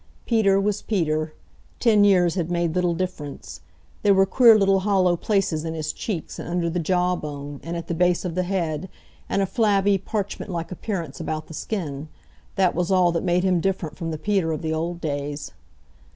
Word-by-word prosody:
Peter 205 -5 +3
was 200 0 0
Peter. 155 -6 -1 0.5
Ten 215 -4 +4
years 180 -4 +4
had 175 -3 -2
made 170 -2 0
little 180 -1 +1
difference. 165 -6 -5 0.4
There 200 -1 +4
were 195 0 +5
queer 230 +1 +6
little 195 -1 +3
hollow 190 -3 +2
places 180 -4 0
in 165 0 -4
his 155 -1 -3
cheeks, 185 -8 -5
and - - -6
under 170 -1 0
the 175 - -1
jaw 180 +2 +1
bone, 145 -3 -6
and 170 +1 -4
at 170 - -5
the - - -2
base 180 +2 +2
of 175 - -2
the 185 - 0
head, 180 -2 -2 0.4
and 200 - +1
a - - +2
flabby, 200 -2 +2
parchment 205 +1 -4
like 170 -2 -4
appearance 175 -6 -4
about 155 0 -3
the - - -11
skin. 155 -6 -4 0.5
That 190 -3 +3
was 175 0 -1
all 180 -2 +4
that 165 -1 -1
made 175 +1 +2
him 185 -2 +2
different 180 -4 -2
from 165 -1 -4
the 160 - -3
Peter 190 -1 0
of 160 +2 -4
the 160 0 -1
old 170 +2 -3
days. 145 -1 -4
175 Hz, 195 wpm, -24 LUFS, 160-195 Hz, 0.5 s, queer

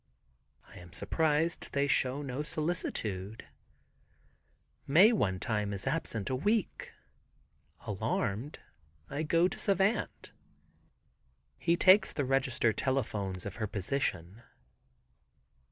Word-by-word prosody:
I - - -13
am 85 -1 -14
surprised 160 - 0
they 140 0 +2
show 140 0 +2
no 135 +1 -4
solicitude. 115 - -3 1.4
Mae 180 +11 +7
one 95 - 0
time 105 -3 -2
is 100 - -5
absent 135 -8 -2
a - - +1
week. 205 - -1 0.9
Alarmed 115 +10 -2 0.5
I 145 +2 -2
go 165 +3 +3
to - - -7
Savant. 195 +2 0 1.3
He 170 0 +2
takes 190 +2 +5
the 145 - -1
register 130 -3 +1
telephones 105 -9 -2
of 100 - -6
her 110 -2 -2
position. 100 -2 -3
135 Hz, 105 wpm, -31 LUFS, 105-160 Hz, 1.4 s, Mae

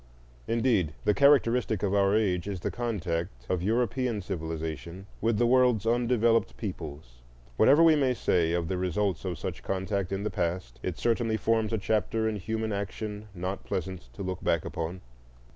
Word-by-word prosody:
Indeed, 110 - +1
the 105 - +4
characteristic 125 -6 +3
of 100 -1 +1
our 100 0 +3
age 95 -5 +1
is 95 -3 -4
the - - -2
contact 85 - -3
of 90 -2 0
European 120 +1 0
civilization 80 -1 -5 0.2
with 115 0 +2
the 120 - +3
world's 125 -3 +4
undeveloped 115 -1 +2
peoples. 75 - -7 0.3
Whatever 145 - +6
we 165 -1 +7
may 135 -4 +2
say 85 -7 +1
of 85 -1 0
the 95 0 -2
results 95 +1 -1
of 90 -3 -3
such - - -5
contact 95 -1 -2
in 100 +1 -2
the 105 - -2
past, 85 -8 -3
it 90 -3 -3
certainly 115 -1 +1
forms 110 +1 +1
a 115 - +1
chapter 110 +2 0
in 110 -1 -1
human 110 +3 -2
action 105 +1 -4
not 90 +2 -4
pleasant 90 -8 -4
to 100 - -6
look 95 -1 -4
back 85 -2 +1
upon. 85 +2 -4
100 Hz, 170 wpm, -28 LUFS, 90-115 Hz, 0.3 s, we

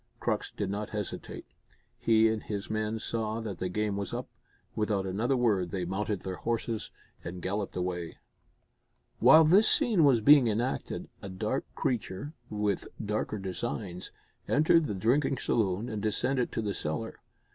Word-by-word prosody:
Crux 110 -3 -1
did 100 -2 -3
not 105 +1 -3
hesitate. 105 -2 -5 0.5
He 110 -1 +4
and 110 -1 0
his 100 -1 -5
men 110 0 -1
saw 110 0 -2
that 105 -5 -5
the 90 - -2
game 105 +1 -1
was 100 -2 -3
up; - - -4 0.5
without 105 -3 0
another 110 +8 0
word 105 -7 +2
they 90 0 -2
mounted 100 +1 -2
their 95 -1 -5
horses 115 -1 -2 0.3
and 90 +1 -6
galloped 100 +3 -3
away. 90 -2 -3 1.0
While 155 +8 +8
this 190 +8 +6
scene 235 - +4
was 135 -5 +5
being 140 +2 +7
enacted 115 +4 -2
a 95 - -7
dark 95 0 -2
creature, 120 +3 -2 0.2
with 105 -2 -1
darker 105 0 -2
designs, 95 -1 -4 0.4
entered 155 +2 +4
the 105 - -3
drinking 130 +7 +2
saloon 105 -1 0
and 110 -3 -4
descended 125 +4 0
to 110 - -1
the 100 -1 -1
cellar. 80 +9 -4
105 Hz, 155 wpm, -29 LUFS, 95-120 Hz, 1.0 s, While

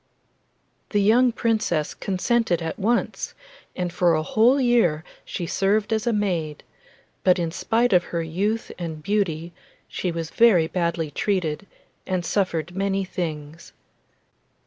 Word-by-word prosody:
The 205 - +1
young 235 +5 +4
Princess 220 -10 0
consented 195 -1 0
at 165 +2 -5
once, 230 +4 -1 0.4
and 180 -2 -3
for 175 -3 +3
a 155 - 0
whole 235 - +3
year 230 - +2 0.2
she 175 - -5
served 205 +5 +1
as 220 +2 -1
a - - +3
maid; 175 -8 -1 0.6
but 185 0 +4
in 170 -2 -1
spite 225 +6 +1
of 180 -1 +4
her 170 -1 -3
youth 200 +8 -2
and 160 -3 -5
beauty 175 -4 -1 0.3
she 180 - -3
was 165 -1 -5
very 215 -8 +5
badly 170 -2 -2
treated, 180 -1 -1 0.4
and 185 -2 -1
suffered 175 -3 -1
many 195 0 0
things. 160 -3 -6
185 Hz, 135 wpm, -24 LUFS, 165-215 Hz, 0.6 s, very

